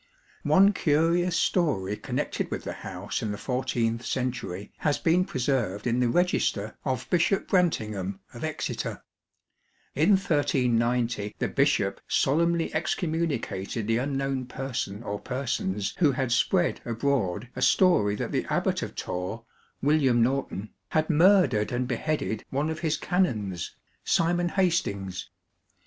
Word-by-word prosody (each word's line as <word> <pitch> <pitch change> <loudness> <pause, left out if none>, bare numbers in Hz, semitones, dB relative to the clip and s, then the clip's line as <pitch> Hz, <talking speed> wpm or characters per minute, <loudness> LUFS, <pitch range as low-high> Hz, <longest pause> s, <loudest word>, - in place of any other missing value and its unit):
One 195 +2 +5
curious 170 +2 +2
story 115 - +1
connected - - -3
with - - -4
the - - -4
house 95 +1 -5
in 110 - -2
the 105 - -4
fourteenth 125 -2 -1
century 120 -6 -3
has 150 -2 +1
been 175 +2 +2
preserved 120 - -1
in 120 0 +1
the 125 -1 +2
Register 115 - +1
of 130 -3 -2
Bishop 180 +2 +2
Brantyngham 105 - 0 0.2
of 120 - -8
Exeter. 155 -1 -3 0.9
In 160 +9 +4
1390 125 - +1
the - - 0
bishop 140 -9 +1
solemnly 170 +4 +2
excommunicated 155 - -2
the 115 +1 +1
unknown 135 -1 -2
person 120 -5 -4
or 100 -2 -4
per 130 +2 -4
sons 100 -4 -1
who 150 -6 +4
had 130 -1 -1
spread 150 +9 +2
abroad 115 -4 -1
a 125 - -5
story 110 - +4
that - - -4
the - - 0
Abbot - - 0
of - - -5
Torre, 95 +6 -4 0.4
William 135 -5 +4
Norton, 120 -5 -2 0.2
had 155 +1 +1
murdered 160 - +4
and 125 0 -1
beheaded 150 +5 -1
THE - - -4
GREATER 110 - -3
ABBEYS - - -19
one 145 +4 0
of 160 - -5
his 160 -2 0
canons, 105 - -1 0.3
Simon 175 +1 +2
Hastings. 100 - -1
130 Hz, 140 wpm, -27 LUFS, 110-160 Hz, 0.9 s, One